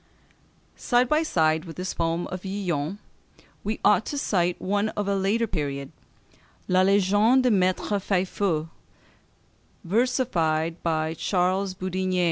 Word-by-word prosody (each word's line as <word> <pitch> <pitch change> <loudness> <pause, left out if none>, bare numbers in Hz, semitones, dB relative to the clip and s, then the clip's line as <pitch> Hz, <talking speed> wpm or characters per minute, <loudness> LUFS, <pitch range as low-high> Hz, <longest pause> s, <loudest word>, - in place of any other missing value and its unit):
Side 245 0 +2
by 305 +4 +2
side 160 - +1
with 165 - -9
this 185 +1 -4
poem 165 +1 -1
of 185 0 -5
Yillon 190 -4 -2 0.7
we - - -3
ought - - +5
to 290 - -3
cite 180 -9 0
one 205 +3 0
of 205 -1 -1
a 200 - +1
later 200 +4 +1
period 140 -8 -4 0.8
"La 185 0 +3
Légende 205 +6 +4
de 250 - +3
Maître 195 +1 +1
Faifeu," 185 -4 0 1.2
versified 175 -8 0
by 160 -1 -1
Charles 185 +2 0
Boudigné. 185 0 -2
185 Hz, 125 wpm, -25 LUFS, 165-205 Hz, 1.2 s, ought